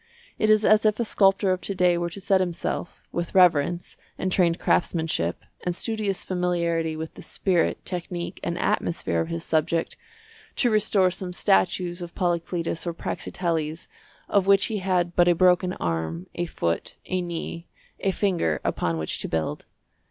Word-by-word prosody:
It 215 Hz, -, +2 dB
is 215 Hz, 0 st, +5 dB
as 215 Hz, 0 st, +5 dB
if 215 Hz, 0 st, +2 dB
a 235 Hz, -, +1 dB
sculptor 195 Hz, -1 st, +3 dB
of 185 Hz, 0 st, -1 dB
to 200 Hz, -, -4 dB
day 180 Hz, -1 st, +4 dB
were 170 Hz, 0 st, -1 dB
to 170 Hz, -, -7 dB
set 190 Hz, 0 st, +2 dB
himself, 175 Hz, -1 st, -3 dB
with 175 Hz, +1 st, -4 dB
reverence, 175 Hz, -2 st, +3 dB, 0.2 s
and 185 Hz, -, -2 dB
trained 175 Hz, -2 st, +3 dB
craftsmanship, 160 Hz, -, 0 dB, 0.2 s
and 175 Hz, -1 st, -1 dB
studious 215 Hz, -2 st, -2 dB
familiarity 170 Hz, -3 st, 0 dB
with 160 Hz, 0 st, -6 dB
the -, -, -11 dB
spirit, 180 Hz, -3 st, 0 dB
technique, 175 Hz, -1 st, -5 dB
and 170 Hz, 0 st, -2 dB
atmosphere 170 Hz, -, 0 dB
of 165 Hz, -, -2 dB
his 165 Hz, 0 st, -4 dB
subject, 165 Hz, +1 st, 0 dB, 0.6 s
to 245 Hz, -, +2 dB
restore 205 Hz, -3 st, +3 dB
some 180 Hz, 0 st, -5 dB
statues 175 Hz, -, +1 dB
of 175 Hz, -1 st, -8 dB
Polyclitus 170 Hz, -1 st, -1 dB
or 170 Hz, -, -2 dB
Praxiteles 165 Hz, -3 st, -3 dB, 0.4 s
of 195 Hz, -2 st, +2 dB
which 195 Hz, 0 st, +5 dB
he 215 Hz, -2 st, -2 dB
had 180 Hz, -2 st, 0 dB
but 175 Hz, 0 st, +5 dB
a 175 Hz, -, +5 dB
broken 180 Hz, +1 st, +3 dB
arm, 80 Hz, -, -3 dB
a 175 Hz, 0 st, -2 dB
foot, 85 Hz, -, -2 dB
a 185 Hz, 0 st, -1 dB
knee, 170 Hz, 0 st, -5 dB, 0.3 s
a 195 Hz, -, 0 dB
finger 180 Hz, -, 0 dB
upon 85 Hz, -1 st, -1 dB
which 80 Hz, -1 st, -3 dB
to -, -, -3 dB
build. 80 Hz, -1 st, -3 dB
175 Hz, 165 wpm, -25 LUFS, 165-190 Hz, 0.6 s, is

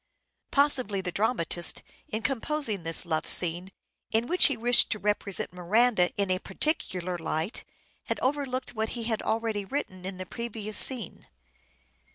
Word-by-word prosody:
Possibly 255 Hz, -9 st, +1 dB
the 180 Hz, -1 st, -4 dB
dramatist, 175 Hz, -5 st, 0 dB, 0.2 s
in 220 Hz, +1 st, -4 dB
composing 270 Hz, -, 0 dB
this 165 Hz, +1 st, +3 dB
love 160 Hz, -2 st, -1 dB
scene, 175 Hz, +2 st, -1 dB, 0.4 s
in 225 Hz, +1 st, +1 dB
which 360 Hz, +7 st, +6 dB
he 280 Hz, -, -2 dB
wished 240 Hz, +2 st, +4 dB
to 215 Hz, -, -1 dB
represent 205 Hz, -3 st, -1 dB
Miranda 185 Hz, +1 st, +3 dB
in 200 Hz, -2 st, +1 dB
a 185 Hz, -, +1 dB
particular 185 Hz, -, -1 dB
light, 160 Hz, +4 st, -3 dB, 0.4 s
had -, -, -2 dB
overlooked 260 Hz, -2 st, -2 dB
what 220 Hz, -1 st, -2 dB
he 235 Hz, -, -3 dB
had 225 Hz, -1 st, -1 dB
already 220 Hz, -2 st, -1 dB
written 195 Hz, -5 st, -5 dB
in 185 Hz, 0 st, -5 dB
the 185 Hz, -, -6 dB
previous 215 Hz, 0 st, -5 dB
scene. 240 Hz, -10 st, +3 dB
215 Hz, 150 wpm, -27 LUFS, 185-245 Hz, 0.4 s, which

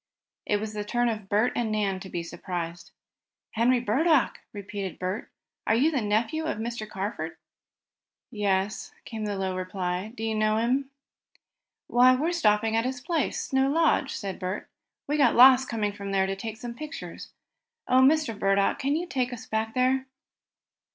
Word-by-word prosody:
It 205 Hz, -, +2 dB
was 215 Hz, 0 st, -5 dB
the 210 Hz, -1 st, -3 dB
turn 240 Hz, +3 st, +1 dB
of 215 Hz, -3 st, -5 dB
Bert 215 Hz, +4 st, +2 dB
and 230 Hz, -2 st, -1 dB
Nan 200 Hz, -3 st, 0 dB
to 190 Hz, -, -9 dB
be 170 Hz, -2 st, -3 dB
surprised. 170 Hz, 0 st, -5 dB, 0.6 s
"Henry 240 Hz, +3 st, +3 dB
Burdock!" 270 Hz, +6 st, +2 dB
repeated 200 Hz, -2 st, -6 dB
Bert. 185 Hz, +4 st, -4 dB, 0.4 s
"Are 220 Hz, -, +4 dB
you 285 Hz, +8 st, +3 dB
the 275 Hz, -5 st, 0 dB
nephew 225 Hz, +10 st, 0 dB
of 320 Hz, -, -2 dB
Mr. 225 Hz, -1 st, -4 dB
Carford?" 205 Hz, +2 st, -4 dB, 0.9 s
"Yes," 200 Hz, -2 st, -1 dB, 0.2 s
was 220 Hz, -1 st, -3 dB
the 205 Hz, -1 st, -2 dB
low 190 Hz, -1 st, -2 dB
reply. 185 Hz, +1 st, -3 dB
"Do 225 Hz, -, -5 dB
you 225 Hz, 0 st, 0 dB
know 215 Hz, 0 st, +2 dB
him?" 260 Hz, +4 st, +1 dB, 1.0 s
"Why, 255 Hz, +1 st, +5 dB
we're 310 Hz, +7 st, 0 dB
stopping 225 Hz, -9 st, +2 dB
at 225 Hz, -, +2 dB
his 255 Hz, 0 st, -3 dB
place 310 Hz, +3 st, -1 dB
Snow 265 Hz, 0 st, +2 dB
Lodge," 300 Hz, -3 st, +2 dB
said 195 Hz, -2 st, -5 dB
Bert. 185 Hz, +2 st, -4 dB, 0.4 s
"We 295 Hz, +2 st, -1 dB
got 285 Hz, -, +4 dB
lost 260 Hz, +1 st, +7 dB
coming 210 Hz, -3 st, -1 dB
from 200 Hz, -1 st, -7 dB
there 190 Hz, -1 st, +2 dB
to 195 Hz, 0 st, -2 dB
take 220 Hz, +2 st, -6 dB
some 235 Hz, +1 st, -6 dB
pictures. 305 Hz, +5 st, -8 dB, 0.6 s
Oh, 255 Hz, +1 st, +5 dB
Mr. 280 Hz, -1 st, +4 dB
Burdock, 195 Hz, 0 st, +2 dB
can 280 Hz, +2 st, +1 dB
you 340 Hz, +3 st, -1 dB
take 255 Hz, -8 st, -1 dB
us 245 Hz, -, -7 dB
back 220 Hz, +1 st, -2 dB
there?" 260 Hz, +1 st, +2 dB
220 Hz, 170 wpm, -27 LUFS, 200-260 Hz, 1.0 s, lost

